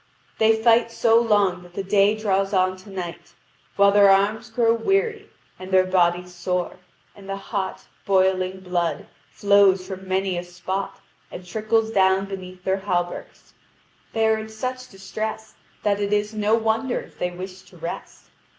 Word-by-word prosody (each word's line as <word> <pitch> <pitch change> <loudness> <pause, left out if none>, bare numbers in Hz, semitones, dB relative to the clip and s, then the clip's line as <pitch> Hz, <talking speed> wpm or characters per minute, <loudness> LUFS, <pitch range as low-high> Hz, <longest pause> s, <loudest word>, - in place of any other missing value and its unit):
They 220 0 +4
fight 230 +1 +4
so 230 0 +4
long 205 -5 +2
that 175 0 -16
the 195 - -3
day 200 +2 +3
draws 195 -2 0
on 185 -1 +2
to 185 +3 -15
night, 180 -3 -7 0.4
while 200 0 +5
their 200 0 +6
arms 210 +4 +2
grow 230 0 +2
weary 410 - 0 0.3
and 185 0 -8
their 185 -1 +4
bodies 180 -1 +1
sore, 180 0 -3 0.4
and 195 -1 -13
the 195 - -2
hot, 195 -1 -4 0.2
boiling 190 -1 +1
blood 175 -2 -2 0.2
flows 200 -2 +3
from 190 0 -8
many 190 -1 0
a - - -6
spot 185 +2 -5 0.3
and 180 - -9
trickles 220 +4 0
down 190 -1 +3
beneath 185 -2 -9
their 190 +1 +1
hauberks: 175 -3 -4 0.6
they 225 0 +1
are 220 0 +2
in 220 0 -7
such 255 +3 -5
distress 215 +3 -6 0.3
that 205 -1 +1
it 200 0 -1
is 210 +1 0
no 215 +1 +2
wonder 225 +3 0
if - - -17
they 180 - 0
wish 185 +1 -8
to - - -17
rest. - - -7
195 Hz, 165 wpm, -23 LUFS, 185-220 Hz, 0.6 s, their